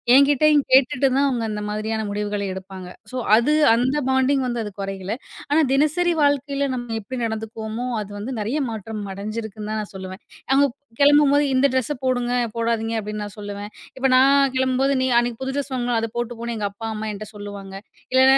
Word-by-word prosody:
என்கிட்டயும் 290 +2 +5
கேட்டுட்டு 260 0 +5
தான் 280 +1 +3
அவங்க 245 -4 -1
அந்த 210 0 -3
மாதிரியான 220 +1 -2
முடிவுகள 205 0 -2
எடுப்பாங்க. 190 -1 -8 0.2
சோ - - -7 0.2
அது 250 +7 +3 0.2
அந்த 250 +5 +2
பாண்டிங் 265 +1 +2
வந்து 240 -2 -2
அது 210 - -6
குறையல. 195 +1 -4 0.4
ஆனா 310 +2 +4
தினசரி 310 +5 +2
வாழ்க்கையில 280 0 +1
நம்ம 240 -2 -4
எப்படி 255 +6 -6
நடந்துக்கோவோமோ, 220 +1 -4 0.2
அது 205 0 -8
வந்து 240 +6 -5
நிறையா 235 +9 -1
மாற்றம் 220 -1 -5
அடைஞ்சிருக்குன்னு 215 +1 -5
தான் 215 - -1
நான் 205 - -8
சொல்லுவேன். 190 +1 -8 0.3
அவங்க 280 +1 +5 0.3
கிளம்பும்போது 290 0 +5
"இந்த 275 +2 +4
ட்ரெஸ் 260 +2 0
போடுங்க, 245 -1 0 0.3
போடாதீங்க" 230 0 0
அப்டின்னு 210 0 -5
நான் 205 0 -10
சொல்லுவேன். 205 0 -6 0.3
இப்ப 265 - -3
நான் 275 0 +5
கிளம்பும்போது 260 +1 +2
"நீ 260 - +1
அன்னைக்கு 240 +1 -2
புது 265 +1 -3
ட்ரெஸ் 275 -1 -3
வாங்குன, 240 -1 0
அதப் 225 +1 -5
போட்டுப் 240 -1 -3
போன்னு." 235 -1 -3
எங்க 205 -1 -1
அப்பா, 225 +2 -7
அம்மா 215 0 -4
என்ட்ட 210 +1 -7
சொல்லுவாங்க. 200 -1 -8 0.4
இல்லனா 265 +1 +6
235 Hz, 180 wpm, -22 LUFS, 210-270 Hz, 0.4 s, இல்லனா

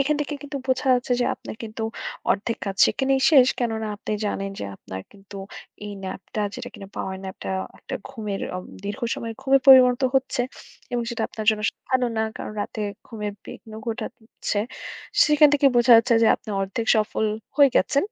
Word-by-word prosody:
এখান 290 +2 +2
থেকে 295 0 -2
কিন্তু 285 0 -6
বোঝা 260 +1 0
যাচ্ছে 245 0 -1
যে, - - +3
আপনার - - -9
কিন্তু 220 0 -6 0.5
অর্ধেক 230 +3 0
কাজ 195 -1 -4
সেখানেই 270 0 +1
শেষ 265 -5 +7
কেননা, 225 -3 -1
আপনি 215 - -5
জানেন 195 -1 -2
যে, - - -4
আপনার 95 0 -8
কিন্তু 200 0 -13 0.5
এই 205 - -6
ন্যাপটা 190 +3 -5
যেটা, - - -6
কিনা 195 - -10
পাওয়ার 190 0 -3
ন্যাপটা 190 - -6 0.3
একটা - - -7
ঘুমের 215 -6 -5 0.2
আ - - -3 0.3
দীর্ঘ 205 +6 -4
সময়ের 230 -1 -5
ঘুমে 275 0 +5
পরিণত 255 -1 +8
হচ্ছে। 265 -1 +1 0.5
এবং 240 - 0
সেটা 230 -1 -3
আপনার 215 - -6
জন্য 215 -1 -2 0.3
ভালো 255 -1 +3
না, 220 - +2
কারণ - - -6
রাতে 215 - -4 0.3
ঘুমের 210 -3 -5
বিঘ্ন 220 - -11
ঘটা 230 0 -2 0.4
চ্ছে। 205 - +1 0.6
সেখান 300 0 +6
থেকে 280 -1 +4
বোঝা 240 0 +6
যাচ্ছে 235 +1 +4
যে, - - +6
আপনি - - -18
অর্ধেক 195 +4 -2
সফল 215 0 0 0.3
হয়ে 280 -2 +7
গেছে 280 - +1
230 Hz, 180 wpm, -24 LUFS, 210-265 Hz, 0.6 s, পরিণত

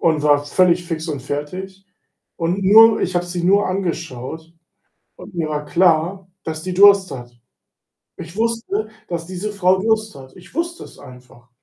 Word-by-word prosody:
Und 160 -3 +1
war 145 -1 +3
völlig 175 +3 +2
fix 165 -1 -5
und 145 -3 -4
fertig. 185 +8 -6 0.5
Und 175 +3 -1
nur 220 +3 +7
ich 185 - -2
habe 175 0 0
sie 175 0 -4
nur 200 +3 +3
angeschaut 165 -4 -5 0.6
und 185 - -13
mir 165 -2 -1
war 150 -1 -3
klar, 175 +3 +1 0.2
dass 155 -1 -5
die 185 - -4
Durst 200 0 +6
hat. 120 -2 -10 0.8
Ich 170 +2 -10
wusste, 225 -1 -2 0.2
dass 170 -1 -5
diese 190 +3 -5
Frau 190 -2 +2
Durst 215 -1 0
hat. 130 -1 -13
Ich 180 0 -16
wusste 340 +1 -3
es - - -14
einfach. 125 -1 -16
175 Hz, 165 wpm, -19 LUFS, 155-195 Hz, 0.8 s, nur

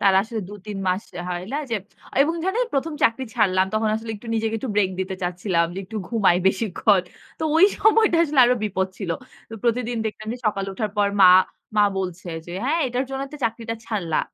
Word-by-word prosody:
তারা 195 -1 +4
আসলে 220 0 -5
২ 205 - -8
৩ 205 -2 -5
মাস 185 +3 0 0.3
হয় 175 0 -3
লা 290 - 0
যে 225 - +1 0.5
এবং 325 +3 0
ধরেন 445 +7 +1
১ম 300 +4 0
চাকরি 230 +3 +2
ছাড়লাম 185 -1 +3
তখন 215 0 +1
আসলে 225 0 -6
একটু 210 - -14
নিজেকে 225 0 0
একটু 255 - -5
ব্রেক 195 -3 +3
দিতে 190 0 -3
চাচ্ছিলাম 175 -1 0
যে 190 - -5
একটু 215 +4 -8
ঘুমাই 200 -7 +3
বেশিক্ষণ। 195 -1 +2 0.4
তো - - 0
ওই 335 - +8
সময়টা 435 -4 +4
আসলে 295 -4 +3
আরো 245 +1 +4
বিপদ 190 -2 0
ছিল। 190 -5 -4 0.4
তো - - -6
প্রতিদিন 240 0 0
দেখলাম 215 0 -6
যে 245 - -6
সকালে 195 -2 -1
উঠার 215 0 -2
পর 205 -1 +4
মা 185 - +10 0.5
মা 210 - +6
বলছে 180 -1 -4 0.2
যে, 175 - -8
"হ্যাঁ 305 +6 +1
এটার 250 +2 -1
জন্য 270 0 -3
তো - - -6
চাকরিটা 230 0 -2
ছাড়লা। 175 -8 -1
215 Hz, 205 wpm, -23 LUFS, 190-245 Hz, 0.5 s, মা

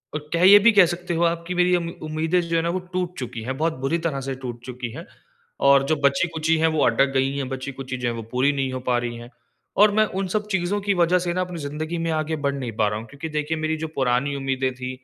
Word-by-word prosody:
अ, - - +2 0.2
कह 170 +1 +1
ये 205 +1 +10
भी 230 +3 +6
कह 205 -4 +7
सकते 175 0 -3
हो 170 +1 +1
आप 170 0 +1
कि 180 - -3
मेरी 180 0 +3
अम 170 -1 -1
उम्मीदें 160 +3 0
जो 170 -1 -3
है 165 - +3
ना 170 - 0
वो 180 +2 -1
टूट 180 -1 -2
चुकी 120 -3 -5
है, 125 +4 -3
बहुत 160 +4 0
बुरी 135 +5 0
तरह 140 -4 -3
से 135 - -2
टूट 120 -2 -7
चुकी 125 -2 -6
है। - - -8 0.6
और 140 0 +6
जो 155 - +1
बची-खुची 160 +3 +2
है 160 +1 +3
वो 150 -3 +2
अटक 135 +4 +3
गई 135 +1 +1
है। 140 - -1
बची-खुची 130 0 -5
जो 125 -1 -2
है 120 - 0
वो 115 - -5
पूरी 130 +3 +2
नहीं 135 -2 -1
हो 130 - -3
पा 125 -1 +2
रही 120 0 -3
है। 120 +1 -10 0.5
और 210 +1 +6
मैं 215 - +5 0.2
उन 195 - -1
सब 210 +3 -2
चीज़ों 190 +2 0
की 200 0 +1
वज़ह 175 0 +3
से 175 -1 -2
ना 185 - 0
अपनी 180 -1 -4
ज़िंदगी 155 +3 -4
में - - 0
आगे 155 0 -1
बढ़ 140 - +1
नहीं 130 -4 -4
पा 105 - +3
रहा 105 +1 -3
हूँ। 110 - -9
क्योंकि 140 +7 -7
देखिए 150 +1 -2
मेरी 155 0 -1
जो 160 +1 -4
पुरानी 130 +2 +1
उम्मीदें 135 -1 -1
थी 125 0 -5
155 Hz, 275 wpm, -23 LUFS, 130-175 Hz, 0.6 s, ये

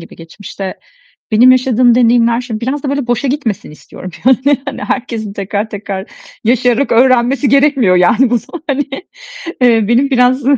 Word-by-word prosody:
gibi, 165 - -13
geçmişte 190 +3 -8 0.6
benim 235 +4 +5
yaşadığım 250 -2 +3
deneyimler, 235 -1 +2
şimdi 230 -3 -6
biraz 270 +5 -3
da 280 - -4
böyle 280 -3 -3
boşa 245 +3 -1
gitmesin 230 - -3
istiyorum 180 +4 -11
yani. 265 +2 +3
Hani, 280 - -6
herkesin 230 -5 -4
tekrar 205 +2 -4
tekrar 200 -1 -6 0.4
yaşayarak 245 +2 +1
öğrenmesi 255 +3 +2
gerekmiyor 275 -9 +3
yani 225 +8 +3
bu 240 - +2
son 325 +9 -11
hani. 285 0 -1 0.8
Eee, 230 -3 +4
benim 260 +4 +2
biraz, 250 0 +2
245 Hz, 155 wpm, -13 LUFS, 215-265 Hz, 0.8 s, benim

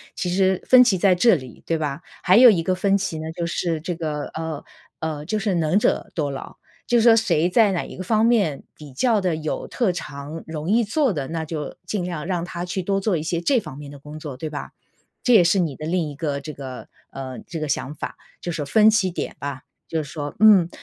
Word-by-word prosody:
其 180 - -2
实 190 0 +2
分 255 -1 +8
歧 205 -7 +2
在 190 -1 +4
这 230 +6 +5
里， 130 -6 -9
对 165 - 0
吧。 150 0 -3 0.2
还 185 +4 +5
有 245 -1 +9
一 175 -5 +1
个 185 +3 0
分 195 +1 +2
歧 190 -5 -2
呢， 160 +1 -5
就 170 0 -3
是 165 -2 -2
这 175 +1 -3
个， 155 -3 -3
呃 160 -2 -4 0.4
呃， 155 -2 -4
就 215 +5 -1
是 200 -3 0
能 165 +4 +2
者 210 - 0
多 150 -4 -1
劳。 135 - -7 0.3
就 240 - +2
是 - - +3
说 230 0 +7
谁 175 -6 +2
在 210 +2 +4
哪 175 - -1
一 - - -10
个 185 - -5
方 220 +3 +2
面 205 - +2
比 145 -4 -12
较 225 - +2
地 180 -4 0
有 155 -1 -4
特 230 -7 0
长， 150 -1 -7
容 160 +1 -5
易 230 +3 +4
做 260 +4 +1
的， 145 -6 -3
那 160 +1 -3
就 155 -2 -5
尽 195 -4 -2
量 170 -4 -4
让 175 -3 -1
他 175 0 -5
去 185 +1 -3
多 195 +2 0
做 195 -4 +1
一 150 - -4
些 170 +1 -1
这 255 +7 +3
方 155 -9 -9
面 145 -1 -9
的 145 - -10
工 150 +2 -10
作， 145 -4 -7
对 155 - -5
吧？ 150 - -6 0.5
这 250 - +4
也 200 -6 +8
是 170 +3 +3
你 160 -6 -1
的 155 - -7
另 175 -2 0
一 145 - -8
个 145 -1 -2
这 150 +2 -7
个 130 -2 -8 0.2
呃 130 -1 -7
这 165 - -7
个 155 - -3
想 140 +1 -2
法， - - -6 0.2
就 175 - -4
是 - - -4
说 150 - -3
分 215 +9 +5
歧 200 -4 +2
点 175 - -5
吧。 140 -2 -5 0.3
就 160 -2 -1
是 140 - -11
说 145 -3 -5
嗯， 200 -6 +7
170 Hz, 270 characters per minute, -23 LUFS, 150-195 Hz, 0.5 s, 有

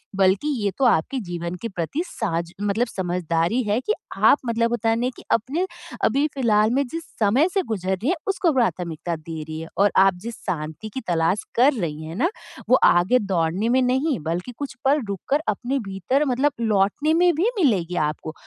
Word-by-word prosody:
बल्कि 195 +8 +2 0.2
ये 200 - +2
तो 270 - +2
आपके 245 +5 +2
जीवन 175 -1 -5
के 230 - -2
प्रति 180 - -3
साज 170 - -3
मतलब 210 +4 +1
समझदारी 175 +3 -1
है 210 +1 +1
कि 425 - 0 0.2
आप 220 +8 +6
मतलब 230 0 +1
होता 230 -1 0
है 225 - +3
ना 250 +1 +1
कि - - -13
अपने 275 - +1 0.4
अभी 275 +6 +3
फ़िलहाल 220 -5 +3
में 275 +1 +2
जिस 330 +5 -5 0.2
समय 235 - +4
से 390 - +2
गुज़र 190 -3 -2
रही 245 - -2
हैं 365 - +2
उसको 370 -4 +2
प्राथमिकता 175 - -1
दे 160 0 -7
रही 155 +1 -6
है 165 - -7
और 200 0 +4
आप 195 0 +6
जिस 235 0 -5
शांति 155 +6 -4
की 260 - -4
तलाश 170 +3 +1
कर 265 +5 +5
रही 160 - -4
है 160 +1 -7
ना, 335 - +1 0.4
वो 255 - +7
आगे 185 +9 +5
दौड़ने 190 +2 0
में 260 +1 +3
नहीं 265 - +1
बल्कि 170 +8 -3
कुछ 285 -3 -5
पल 285 +2 +3
रुक 200 -3 -4
कर 285 +2 +2
अपने 250 +6 -1
भीतर 195 - 0
मतलब 270 +2 +1
लौटने 215 +8 +2
में 350 +1 +4
भी 380 +9 +2
मिलेगी 190 - +1
आपको। 155 +1 -4
215 Hz, 200 wpm, -23 LUFS, 175-265 Hz, 0.4 s, वो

